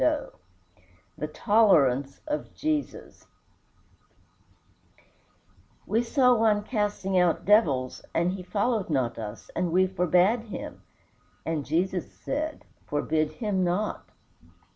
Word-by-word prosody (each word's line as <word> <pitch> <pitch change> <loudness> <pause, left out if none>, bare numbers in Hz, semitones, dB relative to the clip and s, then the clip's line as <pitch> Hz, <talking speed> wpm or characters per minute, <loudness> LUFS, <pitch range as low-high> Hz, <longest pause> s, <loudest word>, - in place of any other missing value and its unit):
XVII - - 0 0.8
THE 150 - -4
TOLERANCE 150 - +3
OF 300 0 -4
JESUS 310 -2 -3 2.6
"We 225 +2 +1
saw 250 +1 +3
one 220 -3 +2
casting 205 -4 0
out 180 -2 +2
devils, 145 - +3
and 170 +2 +1
he 190 0 -5
followed 205 +2 -1
not 130 -6 -1
us; 110 0 -8
and 175 -1 0
we 185 +2 +4
forbade 185 +4 +2
him. 215 - -8 0.6
And 160 -4 -2
Jesus 180 +3 -1
said, 305 +2 -4 0.2
Forbid 155 +1 0
him 205 -5 -1
not." 180 +4 -2
185 Hz, 105 wpm, -27 LUFS, 160-220 Hz, 2.6 s, we